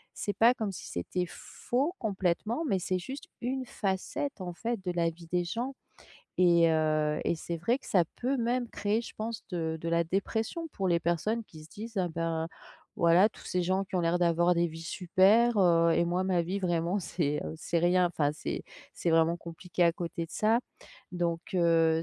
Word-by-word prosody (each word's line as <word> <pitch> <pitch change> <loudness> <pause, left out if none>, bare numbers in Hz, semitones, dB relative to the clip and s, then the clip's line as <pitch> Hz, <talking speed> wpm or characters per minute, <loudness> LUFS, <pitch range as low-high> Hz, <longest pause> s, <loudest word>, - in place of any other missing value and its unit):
c'est 205 - -2
pas 235 +2 +6
comme 215 -5 -3
si - - -8
c'était 180 - -2
faux 275 - -2
complètement 210 - -1
mais 195 - +2
c'est 185 +1 -1
juste 270 - -7 0.2
une 255 +1 -2
facette, 205 +6 -3
en 180 -1 -4
fait, 230 +1 -3
de 180 - 0
la 170 -1 +1
vie 170 +1 -12
des 175 0 +2
gens 240 +9 -3 0.7
et 170 -2 +5
heu 155 -1 +1
et - - +2
c'est 170 +1 -4
vrai 230 +11 +1
que - - -16
ça 180 -4 +3
peut 265 +3 0
même 240 0 0
créer 210 +2 0
je 235 - -9
pense 225 +1 -4
de 160 -3 -2
de 165 - -3
la 170 0 +2
dépression 220 - -2
pour 195 -9 -3
les 170 -1 +2
personnes 185 +8 0
qui 155 -6 -13
se 155 - -17
disent: 225 +1 -8
«Ah 180 -2 +1
bah, 165 0 -2 0.5
voilà 175 +5 +5
tous - - -14
ces 180 -1 0
gens 190 +2 +1
qui 190 - -11
ont - - +2
l'air 170 +1 +1
d'avoir 175 0 +3
des 170 0 +2
vies 165 0 -8
super, 195 +7 +3
heu 170 -3 +5
et - - +3
moi 175 +2 0
ma 180 -2 +2
vie 185 +4 -2
vraiment 175 +1 0
c'est, 150 -4 -1
heu, - - -5
c'est 170 +2 -1
rien, 180 +1 +4
enfin 145 -4 0
c'est 150 - -4 0.3
c'est 175 - -3
vraiment 165 +1 +3
compliqué 175 +2 -3
à 170 -1 +5
côté 170 -1 -4
de 165 - -22
ça». 220 +6 +2 0.5
Donc 170 -1 -1
heu, 165 -2 +3
180 Hz, 205 wpm, -30 LUFS, 170-215 Hz, 0.7 s, pas